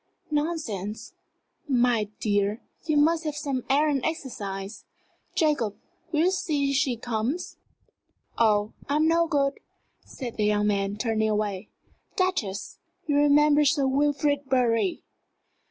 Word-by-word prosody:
"Nonsense! 290 - -3 0.6
My 245 -4 +3
dear, 205 +1 0 0.2
you 305 -2 +2
must 320 +3 +3
have 305 -2 -3
some 280 -4 -2
air 290 +3 +4
and 275 -4 0
exercise! 205 -10 -4 0.5
Jacob, 295 - +1 0.4
will 310 -2 +2
you 360 +3 +3
see 290 -7 0
she 265 -3 +1
comes?" 240 +8 -3 0.8
"Oh, 210 -2 +2 0.2
I'm 305 +2 +3
no 335 +1 +3
good," 280 -2 0 0.4
said 245 -3 -7
that 215 - +1
young 210 0 +2
man, 200 -1 0
turning 220 -1 0
away. 210 -2 -2 0.5
"Duchess, 240 - -2 0.3
you 290 - 0
remember 295 +1 +5
Sir 285 -1 +2
Wilfrid 285 +1 +1
Bury?" 250 +6 +1
270 Hz, 120 wpm, -26 LUFS, 215-295 Hz, 0.8 s, remember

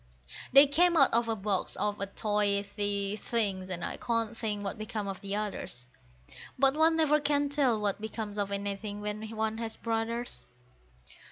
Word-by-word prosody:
They 275 +2 +10
came 340 +5 +3
out 275 -5 +5
of 235 0 +3
a 225 - 0
box 200 -2 -1
of 205 -1 -2
toy 205 -1 +2
tea 205 0 -1
things, 200 -5 -1
and 175 -2 -3
I - - -4
can't 230 -1 -1
think 210 -3 -3
what 200 +2 -4
became 215 -1 -4
of 195 -1 -5
the 200 0 -3
others; 205 -12 -4 0.7
But 270 +1 +4
one 320 +2 +4
never 305 -2 +3
can 290 -1 +1
tell 270 -6 +2
what 205 -1 -1
becomes 215 -1 -5
of 200 -1 -1
anything 200 +1 -3
when 210 +1 -4
one 220 0 -2
has 225 -1 -4
brothers.) 230 +1 -2
215 Hz, 170 wpm, -30 LUFS, 205-235 Hz, 0.7 s, They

